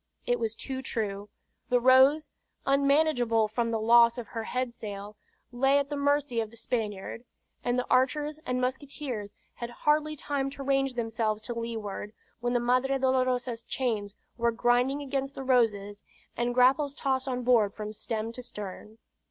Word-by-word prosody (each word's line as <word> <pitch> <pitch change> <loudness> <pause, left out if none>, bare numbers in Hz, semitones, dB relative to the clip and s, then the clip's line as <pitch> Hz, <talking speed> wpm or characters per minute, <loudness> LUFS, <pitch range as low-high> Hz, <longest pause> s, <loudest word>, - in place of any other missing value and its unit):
It 245 0 +1
was 225 -1 -2
too 265 +2 -5
true. 205 -5 -3 0.4
The 245 - +4
Rose, 260 +5 +5 0.3
unmanageable 275 -5 +3
from 230 +2 -1
the 225 -1 0
loss 235 +1 +6
of 240 - -6
her 225 -2 -4
head 250 -1 -2
sail, 205 -2 -7 0.4
lay 270 +3 +3
at 285 +1 -1
the - - -1
mercy 285 -3 +1
of 220 - -4
the 235 - -14
Spaniard; 220 -1 -3 0.4
and 245 0 0
the 250 - 0
archers 295 +4 +1
and 250 0 -1
musketeers 255 -4 -3 0.2
had 235 - -6
hardly 300 +4 +1
time 280 -1 -2
to 275 0 -8
range 270 -1 +1
themselves 225 -2 -1
to 240 - -4
leeward, 220 -3 -5 0.3
when 240 +1 -1
the 245 - +3
Madre 255 +3 +2
Dolorosa's 255 -2 +1
chains 215 -7 -2 0.2
were 235 0 +3
grinding 245 +5 +2
against 275 0 -3
the 270 - -5
Rose's, 210 -6 +1 0.3
and 240 +1 -1
grapples 270 +3 +4
tossed 265 -1 -1
on 250 -1 -2
board 230 -5 +3
from 215 0 -5
stem 220 +1 -3
to 250 - -8
stern. 210 -2 -8
245 Hz, 165 wpm, -28 LUFS, 225-270 Hz, 0.4 s, loss